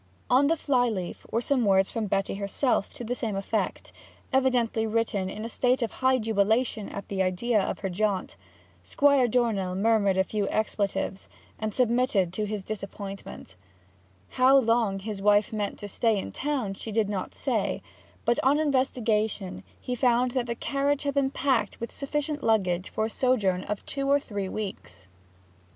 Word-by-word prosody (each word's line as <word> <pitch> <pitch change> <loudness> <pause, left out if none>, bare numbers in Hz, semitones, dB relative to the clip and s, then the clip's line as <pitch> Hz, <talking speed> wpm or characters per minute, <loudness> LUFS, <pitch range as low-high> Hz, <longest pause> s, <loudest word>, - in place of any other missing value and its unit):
On 270 +3 +5
the 330 +2 +2
fly 250 -5 +2
leaf 185 -5 -5
were 230 - 0
some 255 0 +1
words 195 -2 +3
from 225 -2 -2
Betty 195 0 0
herself 200 +3 0
to 260 - -6
the 235 +2 -2
same 225 -4 -3
effect, 195 0 -2 0.4
evidently 245 -4 +2
written 215 -4 0
in 215 +3 -6
a - - -2
state 250 +2 +1
of 225 - -2
high 260 0 +2
jubilation 220 0 +1
at 200 - -7
the 195 -1 -2
idea 200 +4 +1
of - - -3
her 195 - -2
jaunt. 195 0 -1 0.5
Squire 275 - +3
Dornell 215 -6 0
murmured 200 -1 +2
a 190 - +4
few 205 0 -2
expletives, 200 -2 -2 0.3
and 215 0 -2
submitted 235 -6 +2
to 210 +2 -1
his 210 -1 -4
disappointment. 195 - -7 0.7
How 260 +2 +5
long 230 -5 +2
his 200 0 -5
wife 210 +2 +3
meant 210 -2 -2
to 205 - -7
stay 220 +2 +1
in 195 - -4
town 265 -9 -2
she 220 +3 -7
did 215 -1 +1
not 200 -2 -4
say; - - -1 0.4
but 235 - +2
on 275 +3 +4
investigation 235 -9 0 0.2
he 250 - -4
found 245 0 +2
that 245 -1 -1
the 235 - -2
carriage 280 +3 0
had 280 -1 -1
been 275 -1 +2
packed 260 -6 0
with 235 - -5
sufficient 295 +1 -3
luggage 185 -5 +1
for 220 - -1
a - - -2
sojourn 210 -9 +1
of 210 -1 -4
two 275 0 -2
or 285 +1 +5
three 200 -7 -4
weeks. 195 - -6
220 Hz, 170 wpm, -27 LUFS, 200-255 Hz, 0.7 s, On